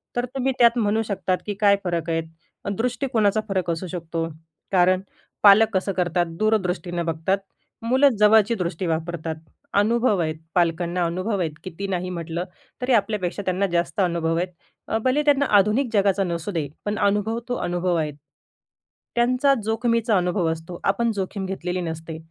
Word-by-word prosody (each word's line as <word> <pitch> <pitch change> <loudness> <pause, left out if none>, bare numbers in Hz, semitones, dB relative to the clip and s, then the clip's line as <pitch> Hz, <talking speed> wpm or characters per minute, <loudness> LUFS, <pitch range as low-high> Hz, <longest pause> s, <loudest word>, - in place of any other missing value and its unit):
तर 245 0 0
तुम्ही 265 0 +1
त्यात 235 0 +5
म्हणू 215 0 +2
शकतात, 190 -2 -1
की 210 - -2
काय 200 -1 +6
फरक 170 -2 -2
आहेत? 165 0 0 0.5
दृष्टिकोनाचा 230 -4 +1
फरक 185 -3 -1
असू 170 +3 -4
शकतो. 165 -2 -3 0.4
कारण 185 0 +4 0.4
पालक 210 +2 +8
कसं 195 +1 0
करतात? 175 0 +1
दूरदृष्टीनं 180 -5 0
बघतात, 165 +4 0 0.5
मुलं 260 +4 +4
जवळची 215 +1 +5
दृष्टी 180 -2 -3
वापरतात. 160 0 -2 0.4
अनुभव 215 0 +3
आहेत 155 -1 -1 0.2
पालकांना, 175 0 +1
अनुभव 185 +5 -1
आहेत, 165 -3 -1
किती 190 +2 -5
नाही 185 -1 -2
म्हटलं 170 -1 -4 0.4
तरी 250 +1 +1
आपल्यापेक्षा 205 -3 0
त्यांना 185 +2 +1
जास्त 175 +3 -1
अनुभव 170 -2 0
आहेत. 180 +1 -1 0.4
अ, 220 - 0
भले 280 +4 +2
त्यांना 285 -1 +4
आधुनिक 220 +6 +1
जगाचा 200 -1 +3
नसू 170 +1 -3
दे, 160 -6 -2 0.2
पण 205 0 -1
अनुभव 205 +3 +1
तो 245 - 0
अनुभव 175 0 0
आहेत. 155 -2 -1 1.0
त्यांचा 255 +3 +3
जोखमीचा 230 0 +1
अनुभव 180 -1 0
असतो, 165 +2 -7
आपण 230 +4 +1
जोखीम 195 0 -3
घेतलेली 185 -1 -3
नसते 160 -1 -5
190 Hz, 155 wpm, -23 LUFS, 170-220 Hz, 1.0 s, पालक